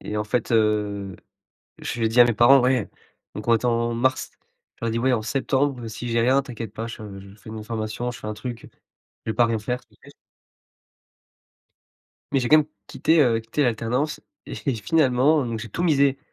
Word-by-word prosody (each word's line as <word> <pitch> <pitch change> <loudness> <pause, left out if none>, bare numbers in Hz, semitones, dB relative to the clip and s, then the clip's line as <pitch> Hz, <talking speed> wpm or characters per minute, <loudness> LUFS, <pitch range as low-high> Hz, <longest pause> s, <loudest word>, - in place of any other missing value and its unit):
et 105 - -5
en 105 - -1
fait, 115 +2 -2
heu, 105 -3 +1 0.6
je - - -5
lui 115 - +1
ai - - +2
dit 115 +2 +3
à - - +10
mes 120 - +2
parents: 125 +5 +6
«Ouais» 125 -3 +1 0.5
donc 105 - -7
on 120 - +5
était 115 +2 0
en 115 0 +1
mars, 130 +2 0 0.5
je - - -7
leur - - 0
ai - - 0
dit: 115 - -1
«Ouais 130 +2 +2
en 110 -3 +1
septembre, 135 0 -1
si 120 +2 -6
j'ai 115 0 +1
rien, 130 +4 +4
t'inquiète 115 -6 -7
pas, 115 +1 -5
je 115 -1 -8 0.2
je 100 0 -13
fais 110 - -12
une 110 -1 -6
formation, 110 +2 -4
je 120 - -9
fais - - -9
un 105 - -3
truc, 115 +2 -7 0.6
je - - -1
vais - - -2
pas 120 - +4
rien 115 -1 -1
faire, 125 +4 -3
t'inquiète». - - -19 2.2
Mais 135 - +2
j'ai 125 - -1
quand 155 - +8
même 155 - +2 0.2
quitté, 160 0 +2
heu, 120 -5 +3
quitté 115 +6 -2
l'alternance 125 +5 -1 0.2
et - - -7 0.2
finalement, 135 +3 +2
donc 115 -2 -3
j'ai 110 -1 -7
tout 170 - -3
misé 140 -4 +3
120 Hz, 215 wpm, -23 LUFS, 110-130 Hz, 2.2 s, à